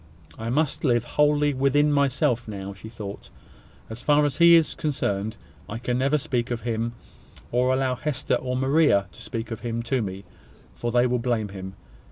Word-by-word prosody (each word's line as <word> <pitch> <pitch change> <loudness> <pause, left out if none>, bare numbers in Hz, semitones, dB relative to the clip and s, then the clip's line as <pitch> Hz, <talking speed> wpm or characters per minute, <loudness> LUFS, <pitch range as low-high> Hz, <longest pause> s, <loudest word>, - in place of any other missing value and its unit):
"I 115 +1 -5
must 150 +3 0
live 120 -5 +3
wholly 150 +2 +2
within 140 +3 +3
myself 130 -4 +1
now," 100 -2 -6
she 100 +3 -11
thought, 105 -3 -8 0.6
"as 110 +2 -8
far 150 +2 +4
as 145 +1 -2
he 170 0 +8
is 165 -2 +3
concerned. 110 -7 -2 0.3
I 110 - -4
can 125 +1 -1
never 140 +3 +2
speak 130 -5 -2
of 120 -2 -3
him, 115 0 -2 0.6
or 125 +1 +2
allow 130 0 +1
Hester 130 +1 -1
and 125 0 -1
Maria 135 -7 +3
to - - -14
speak 115 -1 -5
of 115 - -4
him 115 -1 -3
to 125 +2 0
me; 95 -2 -5 0.5
for 120 - -3
they 120 +1 +4
will 125 0 +1
blame 115 -3 -1
him. 95 -1 -8
125 Hz, 185 wpm, -25 LUFS, 115-140 Hz, 0.6 s, he